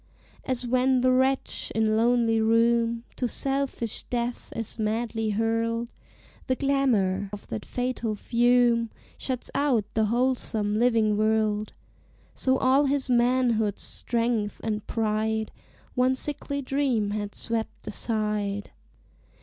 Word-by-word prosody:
As 255 -1 -2
when 255 +1 +2
the 255 0 +4
wretch, 260 +1 +1
in 220 -1 +2
lonely 230 0 +3
room, 230 +1 +2
To 250 - 0
selfish 270 -3 -2
death 240 0 -3
is 225 0 -5
madly 225 0 -1
hurled, 230 +2 -1 0.5
The 255 - +2
glamour 230 -9 +1
of 205 -1 -8
that 110 - -5
fatal 245 -3 -2
fume 235 +1 +3 0.3
Shuts 255 -2 -3
out 260 -8 +2
the 220 0 +2
wholesome 225 -3 0
living 225 -3 +3
world 215 -1 +1 0.6
So 260 0 +1
all 265 +3 +4
his 275 -2 +1
manhood's 240 -4 +2
strength 230 -3 -1
and 215 -1 -2
pride 220 0 -1 0.4
One 255 +1 +2
sickly 280 0 -3
dream 255 -6 0
had 205 -1 -4
swept 230 -1 -3
aside. 210 -2 -2
230 Hz, 115 wpm, -26 LUFS, 215-255 Hz, 0.6 s, the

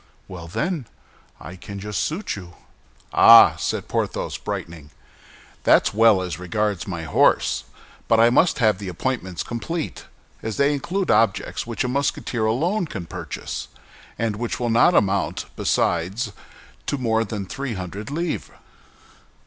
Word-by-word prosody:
"Well, 85 -3 -9
then! 155 - -2 0.5
I 75 +8 -9
can 100 +2 -8
just 105 +1 -3
suit 180 +7 -3
you." 90 -4 -10 0.6
"Ah!" - - +9
said - - -2
Porthos, - - -2
brightening, 80 -3 -6 0.7
"that's - - +4
well 110 -3 +5
as 90 -2 -5
regards 100 0 -2
my 85 -4 -4
horse; 70 -3 +2 0.4
but 115 - +4
I 115 +1 +6
must 160 +7 +3
have 110 -6 +2
the 100 - -6
appointments 95 -1 -3
complete, 155 +8 -4 0.4
as 110 -1 -4
they 140 +1 +3
include 180 +7 -1
objects 110 +1 +1
which 115 +1 -2
a - - -1
Musketeer 125 -3 -1
alone 170 - 0
can 95 - -6
purchase, - - -6 0.5
and 110 -3 -1
which 120 +1 -3
will 120 -1 0
not 120 +10 +5
amount, 100 -1 +1
besides, 95 +7 0 0.5
to 145 - 0
more 115 -3 +1
than 105 -2 -5
three 130 +4 -4
hundred 95 +3 -6
livres." 165 +3 -3
110 Hz, 140 wpm, -23 LUFS, 95-130 Hz, 0.7 s, Ah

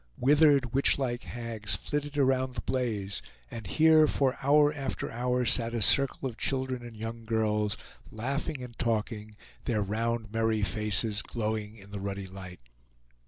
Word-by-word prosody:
Withered 140 -2 +4
witchlike 130 -2 +1
hags 115 -4 -1
flitted 145 +8 -4
around 130 -2 +1
the - - -3
blaze, 110 -7 -2 0.3
and 110 -4 -7
here 155 - +5
for 135 -3 +1
hour 145 +2 +4
after 135 -2 -4
hour 125 +1 0
sat 115 0 +2
a 115 - -1
circle 135 +3 +4
of 120 -3 -8
children 130 -2 -1
and 120 -2 -10
young 115 +1 -6
girls, 105 -2 0 0.3
laughing 135 +4 -3
and 120 -2 -9
talking, 110 -2 -2 0.3
their 110 -5 0
round 110 +1 -2
merry 110 -1 +1
faces 105 0 +2
glowing 110 -1 -3
in 100 -1 -13
the 100 - -5
ruddy 100 0 -4
light. 95 -3 -10
115 Hz, 150 wpm, -29 LUFS, 105-130 Hz, 0.3 s, here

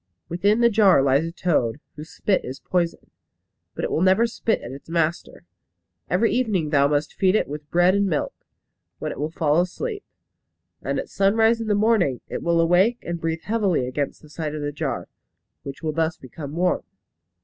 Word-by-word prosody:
Within 200 +7 +2
the 235 - +6
jar 195 -9 +5
lies 140 +3 +3
a 165 - -4
toad, 150 -8 0 0.2
whose 155 +1 -9
spit 195 -3 0
is 130 +2 -7
poison. 175 -2 -2 0.6
But - - -4
it - - -1
will - - 0
never 190 +5 +4
spit 230 -1 -1
at 120 - -8
its 135 +4 -11
master. 165 0 -2 0.7
Every 185 +7 +2
evening 210 -11 0
thou 140 -2 +4
must 145 +1 -1
feed 190 +1 +2
it - - +1
with 145 +1 -8
bread 175 +2 +4
and 200 0 +2
milk, 155 -6 -1 0.6
when - - -4
it - - -8
will 150 +2 -1
fall 160 0 +2
asleep; 410 - -4 0.8
and - - -2
at - - -3
sunrise 220 - +2
in 225 - -4
the 210 - +2
morning 205 - +2
it - - -4
will 170 0 +1
awake 180 +8 +3
and 170 -1 -4
breathe 165 0 -2
heavily 200 - +1
against 140 +4 -3
the 155 - -15
side 155 -1 -4
of 150 - -4
the 145 - -2
jar, 145 - -3 0.5
which 140 +3 -9
will 155 -1 -1
thus 160 +1 0
become 145 +3 -9
warm. 180 +1 +1
170 Hz, 195 wpm, -23 LUFS, 150-200 Hz, 0.8 s, the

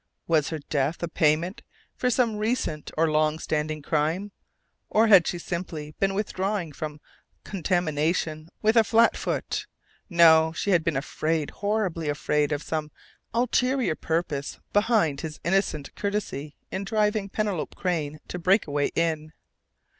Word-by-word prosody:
Was 155 -3 +2
her 160 - -3
death 145 +2 -2
a - - 0
payment 165 +3 +1 0.3
for 250 - 0
some 235 -3 +1
recent 215 -8 -1
or 160 0 +3
long 155 0 +2
standing 155 -1 -2
crime? 160 +7 0 0.6
Or 220 +1 +4
had 195 -6 +7
she 175 - -1
simply 165 -3 -5
been 195 0 +1
withdrawing 195 -3 -2
from 150 +1 -6 0.4
contamination 160 -3 -1
with 220 +2 +4
a 225 - +7
"flat 230 +2 +4
foot"?... - - -3 0.4
No! 160 -2 +6
She 200 - -1
had 175 -3 +4
been 165 -4 0
afraid 155 +2 -1
horribly 195 -7 -1
afraid 150 0 0
of 145 0 -1
some 155 -1 -3 0.4
ulterior 250 -1 +1
purpose 155 -3 -2
behind 205 - +2
his 155 -2 -6
innocent 170 -5 0
courtesy 200 -8 -3 0.2
in 190 - -3
driving 210 -1 0
Penelope 205 -5 -2
Crain 155 -5 -2
to 180 - -4
Breakaway 165 -6 +2
Inn. 160 -2 -1
165 Hz, 140 wpm, -26 LUFS, 155-200 Hz, 0.6 s, had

